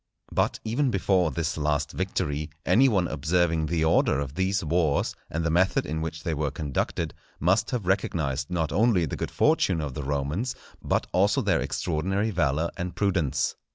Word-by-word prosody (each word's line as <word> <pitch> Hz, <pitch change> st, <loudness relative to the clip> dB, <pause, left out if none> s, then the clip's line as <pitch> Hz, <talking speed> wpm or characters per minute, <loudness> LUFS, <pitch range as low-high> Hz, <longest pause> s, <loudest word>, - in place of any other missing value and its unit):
But -, -, 0 dB
even 130 Hz, +5 st, +1 dB
before 95 Hz, -4 st, +2 dB
this 80 Hz, 0 st, -2 dB
last 75 Hz, -2 st, 0 dB
victory, 75 Hz, +1 st, -2 dB, 0.2 s
any 135 Hz, +4 st, +5 dB
one 95 Hz, -6 st, +2 dB
observing 80 Hz, +1 st, +1 dB
the 80 Hz, 0 st, +1 dB
order 80 Hz, -3 st, +3 dB
of 70 Hz, -2 st, -4 dB
these 95 Hz, +3 st, 0 dB
wars, 80 Hz, -2 st, +1 dB
and 80 Hz, +1 st, -2 dB
the 85 Hz, -, +1 dB
method 90 Hz, +3 st, +2 dB
in 80 Hz, +1 st, -3 dB
which 80 Hz, 0 st, -5 dB
they 80 Hz, -, -1 dB
were 75 Hz, -1 st, -1 dB
conducted, 70 Hz, -1 st, -2 dB, 0.3 s
must 95 Hz, +6 st, +2 dB
have 120 Hz, -7 st, -2 dB
recognized 75 Hz, -7 st, 0 dB
not 80 Hz, -4 st, -1 dB
only 100 Hz, 0 st, +3 dB
the 70 Hz, -, -4 dB
good -, -, -3 dB
fortune 90 Hz, -4 st, +2 dB
of 75 Hz, -4 st, -3 dB
the 75 Hz, -, -4 dB
Romans, 75 Hz, -, -2 dB, 0.3 s
but -, -, 0 dB
also 100 Hz, +7 st, +2 dB
their 95 Hz, -5 st, +2 dB
extraordinary 95 Hz, +7 st, -1 dB
valour 80 Hz, -2 st, 0 dB
and 90 Hz, 0 st, -4 dB
prudence. 85 Hz, -9 st, 0 dB
85 Hz, 175 wpm, -26 LUFS, 75-95 Hz, 0.3 s, any